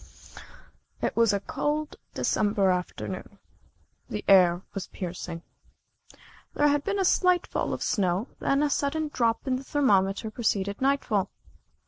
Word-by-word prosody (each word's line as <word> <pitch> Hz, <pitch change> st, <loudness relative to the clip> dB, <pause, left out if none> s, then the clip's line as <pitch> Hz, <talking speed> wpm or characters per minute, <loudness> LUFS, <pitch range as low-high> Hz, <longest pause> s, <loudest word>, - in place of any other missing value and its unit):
It -, -, -1 dB
was 230 Hz, -2 st, +4 dB
a 200 Hz, -, 0 dB
cold 295 Hz, +9 st, -2 dB, 0.2 s
December 205 Hz, -2 st, +2 dB
afternoon. 185 Hz, +2 st, -4 dB, 0.7 s
The 210 Hz, -, -5 dB
air 180 Hz, -2 st, +5 dB
was 195 Hz, -, -5 dB
piercing. 175 Hz, -2 st, -6 dB, 1.1 s
There 295 Hz, 0 st, +4 dB
had 290 Hz, 0 st, +1 dB
been 400 Hz, 0 st, -1 dB
a 385 Hz, -, +1 dB
slight 365 Hz, -1 st, +3 dB
fall -, -, -2 dB
of -, -, -3 dB
snow, 190 Hz, +2 st, 0 dB
then 275 Hz, +2 st, +1 dB
a 295 Hz, -, +2 dB
sudden 305 Hz, +2 st, 0 dB
drop 230 Hz, -5 st, 0 dB
in 260 Hz, -2 st, 0 dB
the 265 Hz, -, -8 dB
thermometer 215 Hz, -7 st, +1 dB
preceded 200 Hz, -3 st, -1 dB
nightfall. 255 Hz, -8 st, +1 dB
220 Hz, 135 wpm, -27 LUFS, 190-285 Hz, 1.1 s, air